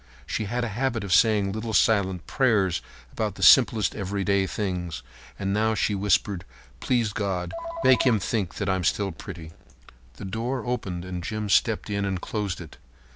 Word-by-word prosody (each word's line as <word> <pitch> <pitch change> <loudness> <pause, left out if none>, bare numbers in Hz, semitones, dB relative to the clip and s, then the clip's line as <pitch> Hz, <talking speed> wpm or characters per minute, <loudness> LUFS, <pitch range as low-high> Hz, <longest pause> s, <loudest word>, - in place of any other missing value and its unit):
She 110 - -2
had 120 +4 -2
a 115 - -2
habit 120 +1 -1
of 95 -2 -1
saying 105 +3 +4
a 100 - -2
little 110 +1 -3
silent 95 -6 +2
prayer 110 -9 +2 0.4
about - - -2
the - - -5
simplest 105 -4 +6
everyday 100 -1 0
things, 90 -6 -3 0.3
and 100 0 -2
now 110 +1 +1
she 105 - +1
whispered: 100 -1 +1 0.4
"Please 120 -5 0
God, 100 -4 -2 0.3
make 130 - +5
him 120 -5 +3
think 100 -3 -2
I 95 - +2
am 95 -1 -2
still 100 +3 0
pretty." 80 -3 -9 0.6
The 100 - -8
door 115 +7 -3
opened 95 -8 -3
and 90 -1 -5
Jim 110 +2 -3
stepped 110 +2 +2
in 100 0 -1
and 95 -2 -1
closed 100 -2 -3
it. 80 -4 -11
100 Hz, 175 wpm, -25 LUFS, 95-110 Hz, 0.6 s, simplest